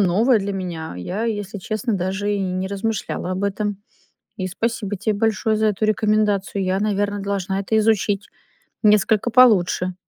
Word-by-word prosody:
новое 215 +6 +3
для 200 +1 -3
меня. 175 - -5
Я, 190 - -3
если 205 -2 -3
честно, 215 +5 -3
даже 190 +3 -1
и - - -1
не 185 0 -2
размышляла 200 -2 -3
об 190 +2 -2
этом. 205 0 -2 0.6
И 185 - -3
спасибо 210 0 -2
тебе 215 +3 -1
большое 220 0 +1
за 220 - +2
эту 210 +1 -1
рекомендацию. 210 -2 +1
Я, 185 +1 0
наверно, 205 -1 0
должна 195 -1 -2
это 220 +3 0
изучить, 210 -2 +1 0.6
несколько 210 +2 +3
получше. 185 -7 +4
205 Hz, 155 wpm, -21 LUFS, 190-215 Hz, 0.6 s, получше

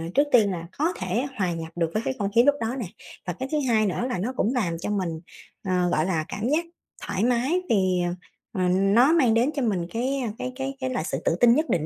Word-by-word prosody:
trước 285 +1 +4
tiên 215 -5 +5
là 170 -2 -5
có 320 +5 +1
thể 185 +8 -1
hòa 185 -4 0
nhập 165 -1 -6
được 165 -2 0
với 215 - 0
cái - - 0
không 200 -1 0
khí 235 - +7
lúc 285 +2 +4
đó 230 +3 -1
nè, 235 - -3 0.4
và 175 - -1
cái 260 +10 -5
thứ 305 - +1
hai 220 -2 +3
nữa 205 +5 -1
là 250 - -1
nó 235 +8 -2
cũng 240 0 +1
làm 185 -10 -1
cho 175 - -4
mình, 185 -6 -2 0.4
ờ, 180 -2 +1
gọi 155 -2 +1
là, 165 -4 -1
cảm 215 +5 -3
giác 315 +4 +1 0.4
thoải 190 - -2
mái, 250 +9 +2
vì, 185 -4 +2
ờ, 175 - -1 0.5
ờ, 180 - +2
nó 195 - +4
mang 260 -9 +4
đến 235 +4 +3
cho 290 - -2
mình 195 -8 0
cái, 260 +4 -1
ơ, 245 - -2
cái 255 - -4
cái 270 +1 -4
cái 260 -1 -2
là 250 -9 -2
sự - - -3
tự - - +2
tin 235 -1 +6
nhất 310 +3 0
định 160 -3 +1
220 Hz, 265 wpm, -25 LUFS, 180-255 Hz, 0.5 s, khí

